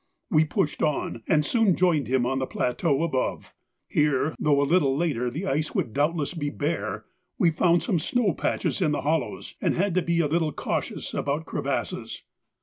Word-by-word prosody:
We 160 -3 +5
pushed 150 0 -1
on, 150 -6 -1
and 150 -1 +3
soon 225 -4 +3
joined 165 - +2
him 130 0 +2
on 135 +1 0
the 130 - -2
plateau 140 +5 0
above. 135 -6 -2 0.3
Here, 150 0 +1
though 145 -2 +3
a - - +3
little 140 -3 +2
later 140 -7 0
the 160 +10 -4
ice 155 -2 -1
would 110 - -1
doubtless 150 +3 0
be 145 -4 -2
bare, 110 -8 -3 0.3
we 170 -3 +4
found 170 0 +3
some 175 -1 +1
snow 215 +3 +1
patches - - -1
in 155 -4 +2
the - - -1
hollows, 150 -1 -2
and - - +1
had 195 +1 +1
to 185 - +2
be 170 0 0
a 160 - +3
little 160 0 0
cautious - - -3
about 145 +3 -1
crevasses. - - -3
150 Hz, 185 wpm, -26 LUFS, 140-170 Hz, 0.3 s, We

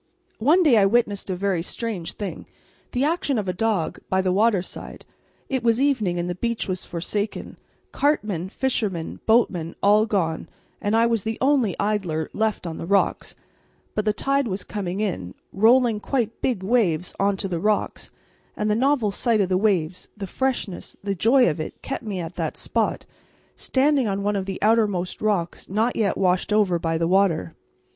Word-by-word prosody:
One 310 +11 +4
day 275 -8 +5
I 195 -2 +5
witnessed 205 -3 +1
a 185 - -1
very 190 -2 0
strange 185 -2 -4
thing, 205 -2 -6 0.4
the 250 +1 0
action 295 -3 0
of 205 -3 -2
a 180 - 0
dog, 205 -3 -1
by 190 - +2
the 185 - +1
waterside. 200 -1 -1 0.4
It 260 -2 -1
was 230 0 +3
evening 240 -11 +1
and 175 0 -2
the 180 - -1
beach 235 +5 -2
was 185 -2 -2
forsaken; 200 +5 -4 0.3
cartmen, 210 - 0
fishermen, 205 -9 -2
boatmen 195 -8 +2
all 210 +2 +5
gone, 170 -7 -1 0.3
and 205 +2 +1
I 230 - +4
was 230 -2 +1
the 220 +3 -3
only 260 -7 +2
idler 190 -7 -1
left 220 -3 -1
on 165 -2 -5
the 165 - -5
rocks; 200 +1 +1 0.6
but 210 - -1
the 215 - +3
tide 275 +4 0
was 190 -1 -3
coming 195 -1 -4
in, 95 - -3 0.2
rolling 230 +2 +4
quite 230 -1 -2
big 235 -8 -1
waves 190 -6 +1
on 200 0 +2
to 195 - -3
the 175 -3 -2
rocks, 210 +4 -1 0.5
and 210 0 0
the - - +2
novel 255 -3 +2
sight 230 +2 +1
of 190 -3 +1
the 185 - +2
waves, 185 -4 0
the 200 - -4
freshness, 240 -3 -3
the 200 -1 -1
joy 240 +7 +4
of 150 - -1
it, 155 - -6
kept 270 - -4
me 205 -4 -4
at 170 0 -5
that - - -3
spot, - - -1 0.5
standing 275 -2 +2
on 200 0 -2
one 205 0 0
of 195 -1 -2
the 195 - -3
outermost 210 -5 +1
rocks 200 -6 -1
not 220 +5 +1
yet 210 -3 +1
washed 185 +1 +1
over 200 -5 +3
by 165 0 -1
the 165 0 0
water. 180 -3 +2
205 Hz, 180 wpm, -23 LUFS, 185-230 Hz, 0.6 s, day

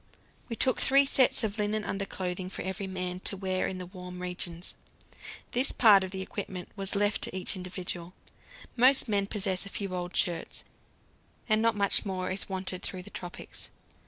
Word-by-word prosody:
We 230 - -3
took 255 +2 +4
three 275 +1 +6
sets 265 -3 +3
of 215 0 -2
linen 210 +1 0
underclothing 185 -2 -3
for - - -6
every 190 +1 -3
man, 185 -1 -4
to 195 - +4
wear 185 -1 -1
in 190 - -4
the 180 - -6
warm 180 0 -9
regions. 180 -1 -2 0.8
This 255 +3 +3
part 205 -5 +6
of 190 - -4
the 190 0 -4
equipment 190 -2 -6
was 195 0 -3
left 205 +1 +1
to - - -2
each 185 - 0
individual; 180 -1 -5 0.6
most 255 +2 +6
men 200 -2 +1
possess 190 -3 -1
a - - -7
few 200 -2 -4
old 180 0 -4
shirts, 170 -4 0 0.8
and 215 -1 +3
not 230 0 +3
much 200 -1 +2
more 185 -2 -3
is 190 +2 +2
wanted 185 -1 -4
through 185 -2 -4
the 205 - -12
tropics. 175 -1 -7
190 Hz, 180 wpm, -29 LUFS, 180-205 Hz, 0.8 s, three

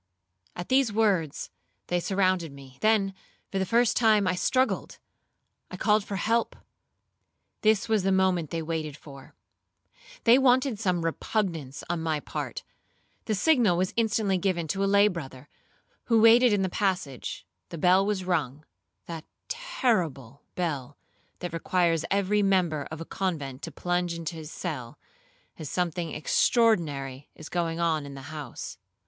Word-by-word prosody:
At 175 - -6
these 260 -3 +3
words, 200 -9 0 0.3
they 175 - 0
surrounded 185 -3 +1
me; 135 -1 -14
then, 215 -3 +3 0.4
for 195 - -1
the 190 - -1
first 235 +2 +3
time, 215 -3 +4
I 185 - +2
struggled,—I 255 +8 -3
called 210 -1 +3
for 200 - -5
help;—this 220 -1 -3
was 220 -2 +2
the 195 +1 +1
moment 185 -4 +2
they 165 -1 -3
waited 155 -2 -3
for; 140 -3 -13 0.9
they 240 +2 +6
wanted 255 -3 +3
some 180 -5 0
repugnance 165 - -2
on 175 -1 -2
my 160 -2 0
part. - - -5 0.6
The 215 - 0
signal 235 - +3
was 185 +1 0
instantly 215 -4 +1
given 175 -3 0
to 195 +3 0
a 195 - +2
lay 200 +1 +6
brother, 145 -8 -6 0.6
who 230 -2 +3
waited 230 +2 +7
in 205 -2 +2
the - - +1
passage,—the 180 - -4
bell 180 +4 +4
was 200 -2 -1
rung,—that 160 0 -5 0.2
terrible 180 - -1
bell, 145 -6 -3 0.4
that 175 -2 -4
requires 165 -1 +1
every 200 +1 +2
member 180 -7 +1
of 160 0 -7
a - - -5
convent 150 -10 -3
to - - -6
plunge 175 -1 -1
into 165 0 -4
his 160 -1 -8
cell, 135 -10 -5 0.6
as 155 - -6
something 175 -2 -2
extraordinary 150 - +1
is 155 - -10
going 170 -1 -1
on 160 -4 0
in 140 - -9
the 135 +2 -9
house. 125 -10 -7
180 Hz, 140 wpm, -27 LUFS, 155-205 Hz, 0.9 s, waited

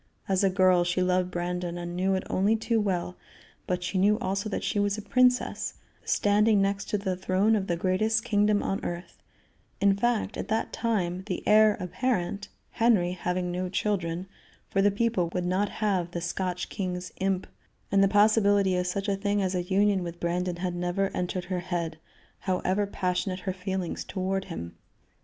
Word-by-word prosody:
As 190 0 +1
a 195 - +5
girl, 185 -1 +4
she 175 +1 0
loved 180 0 +1
Brandon, 175 0 -3
and 175 0 -5
knew 190 +2 +1
it 190 - -2
only 200 +4 +2
too 225 0 0
well, 180 -3 -2 0.5
but 180 0 -1
she 185 +2 -1
knew 205 +3 +4
also 200 -2 -2
that - - -3
she 205 - 0
was 205 0 +1
a - - -4
princess, 250 +2 +2 0.3
standing 210 +1 +3
next 200 0 0
to 210 - +1
the 190 -2 -2
throne 190 +4 +2
of 195 -2 -1
the 170 - 0
greatest 215 +6 +1
kingdom 205 -1 +2
on 195 - -2
earth; 175 +1 -6 0.6
in 200 0 +4
fact, 235 +2 0
at - - -4
that 220 +1 -1
time, 185 -6 -1
the 185 - -4
heir 215 0 +6
apparent 200 0 -2 0.2
Henry 220 -7 +3
having 180 0 -2
no 180 +1 -2
children 180 -3 -1 0.5
for 195 - +2
the 205 - +5
people 200 -4 0
would 180 -1 0
not 185 +3 +1
have 190 -5 -1
the 175 - -4
Scotch 180 +1 -3
king's 180 -2 -4
imp 190 -1 0 0.5
and 195 0 +5
the - - +5
possibility 205 -2 +4
of 180 0 0
such 195 +3 -2
a 200 - +1
thing 205 +1 0
as 190 -1 0
a 180 - 0
union 195 +2 +2
with 170 -1 -6
Brandon 175 +1 -1
had 180 0 -3
never 180 +2 -1
entered 180 0 -2
her 185 -1 -2
head, 170 -3 -3 0.4
however 190 +2 0
passionate 185 -1 -2
her 190 0 -2
feelings 190 -1 -3
toward 190 0 -2
him. 85 - -6
190 Hz, 185 wpm, -27 LUFS, 180-205 Hz, 0.6 s, heir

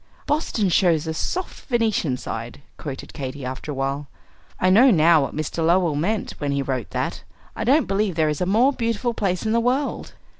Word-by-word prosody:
"'Boston 285 -8 0
shows 170 -3 +3
a 160 - -2
soft 365 - -4
Venetian 220 - +1
side,'" 120 +4 -6
quoted 140 -1 -7
Katy, 135 -1 -6
after 130 +3 -6
a - - -4
while. 135 +2 -2 0.5
"I 185 - +3
know 240 +8 +7
now 165 -5 +5
what 135 - -3
Mr. 155 +2 -2
Lowell 170 -1 +3
meant 190 +9 -1
when 145 -1 -1
he 140 0 0
wrote 130 -3 -3
that. - - -3 0.3
I - - -3
don't 275 +3 +4
believe 195 -2 0
there 160 -1 +2
is 150 +1 -2
a 180 - +1
more 235 +8 +4
beautiful 230 -1 -1
place 190 -3 -1
in 220 - +1
the 230 - +3
world." 255 +4 -1
175 Hz, 195 wpm, -23 LUFS, 145-225 Hz, 0.5 s, know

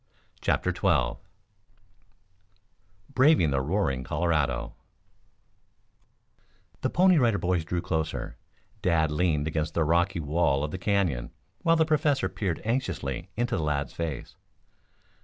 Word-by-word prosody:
CHAPTER - - +1
XII - - +1 1.9
BRAVING 130 - +4
THE 70 -1 +1
ROARING 65 0 0
COLORADO 75 0 0 2.1
The - - 0
Pony 185 -2 +4
Riders 90 - +1
drew 85 0 -2
closer, 80 -3 -3 0.5
Dad 80 -3 +2
leaned 75 -2 +1
against 80 0 -2
the 85 - +2
rocky 85 +3 +1
wall 75 -2 +1
of 75 - -3
the 95 - -5
Canyon, 90 - 0 0.3
while 165 0 +3
the 160 -1 +3
Professor 150 -2 +2
peered 95 -6 -3
anxiously 95 - -2
into 120 +1 0
the 80 - -2
lad's 70 -3 -1
face. 80 -6 -5
85 Hz, 115 wpm, -27 LUFS, 75-105 Hz, 2.1 s, BRAVING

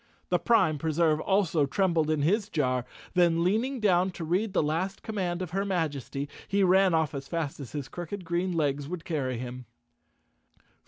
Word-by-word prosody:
The - - +2
Prime 190 -11 +3
Preserve 160 0 +2
also 175 -6 +2
trembled 165 -1 +1
in 155 -2 +1
his 205 +6 +1
jar, 130 - 0 0.3
then 170 -2 +3
leaning 230 +9 +1
down 185 -3 +3
to 170 - -6
read 185 +7 0
the 185 - +2
last 170 +6 -2
command 185 -5 -2
of 175 - -7
her 195 +2 0
Majesty, 145 - -2 0.2
he 200 0 +2
ran 190 -1 +5
off 160 -1 +1
as 135 -1 -5
fast 165 -5 -3
as 135 -5 -8
his 145 -3 -4
crooked 175 +5 -6
green 175 +2 -1
legs 145 -3 -1
would 175 -2 -5
carry 135 -7 -2
him. 125 +1 -6
170 Hz, 175 wpm, -28 LUFS, 150-190 Hz, 0.3 s, ran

